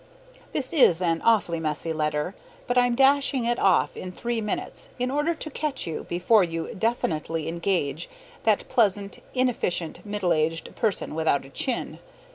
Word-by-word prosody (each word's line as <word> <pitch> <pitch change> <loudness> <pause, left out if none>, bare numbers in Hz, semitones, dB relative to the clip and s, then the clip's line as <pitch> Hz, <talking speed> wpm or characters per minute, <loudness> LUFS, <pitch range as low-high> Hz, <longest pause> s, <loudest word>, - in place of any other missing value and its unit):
This 270 +3 0
is 215 - +5
an 165 -2 0
awfully 200 -7 +2
messy 160 +1 -2
letter, 150 +2 -1 0.3
but 245 - -1
I'm 245 -1 +3
dashing 275 -1 +3
it 240 0 +1
off 190 -2 +3
in 185 - -6
three 235 +4 -2
minutes 210 -1 -3
in 250 +1 -1
order 295 +4 +1
to 310 0 -6
catch 290 -1 -2
you 165 - -5
before 185 +5 +3
you 165 -1 -3
definitely 165 -8 -1
engage 170 - -1 0.3
that - - +2
pleasant, 200 -3 +1 0.2
inefficient 220 -10 0
middle 205 -4 0
aged 165 +1 -1
person 215 -8 -1
without 155 -3 +1
a - - -12
chin. 250 - -3
195 Hz, 155 wpm, -25 LUFS, 165-245 Hz, 0.3 s, is